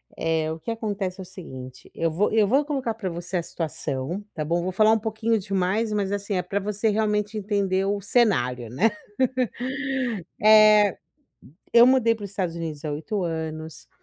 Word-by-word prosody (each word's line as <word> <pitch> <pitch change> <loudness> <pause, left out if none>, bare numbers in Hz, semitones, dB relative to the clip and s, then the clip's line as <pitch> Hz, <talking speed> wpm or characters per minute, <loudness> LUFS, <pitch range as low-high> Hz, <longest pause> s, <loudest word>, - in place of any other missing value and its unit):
Eh, 160 -1 0
o 160 - -6
que 230 - -4
acontece 205 -4 -3
é - - -5
o - - -11
seguinte, 130 -9 -10
eu 165 - 0
vou 175 +6 0
eu 215 -2 +4
vou 270 +7 +3
colocar 270 -6 -2
pra 215 -4 -4
você 175 +2 -4
a 170 - -1
situação, 160 +1 -4
tá 155 -3 -3
bom? 170 +3 0
Vou 185 - -2
falar 215 +3 +4
um 225 - +2
pouquinho 220 +1 0
demais, 195 +2 0
mas, 200 -2 -1
assim, 205 0 -2
é 180 - +1
pra 200 +2 -2
você 210 +2 -1
realmente 210 0 0
entender 195 -2 0
o 200 +1 0
cenário, 125 - +1
né. 130 - 0 2.7
Eh, 200 +7 +2
eu 240 - +9
mudei 250 -3 +4
para 220 - -11
os 200 - -7
Estados 185 -4 -2
Unidos 160 -3 -5
há 150 - -2
8 190 +7 -3
anos, 160 -1 -5
195 Hz, 185 wpm, -24 LUFS, 165-215 Hz, 2.7 s, eu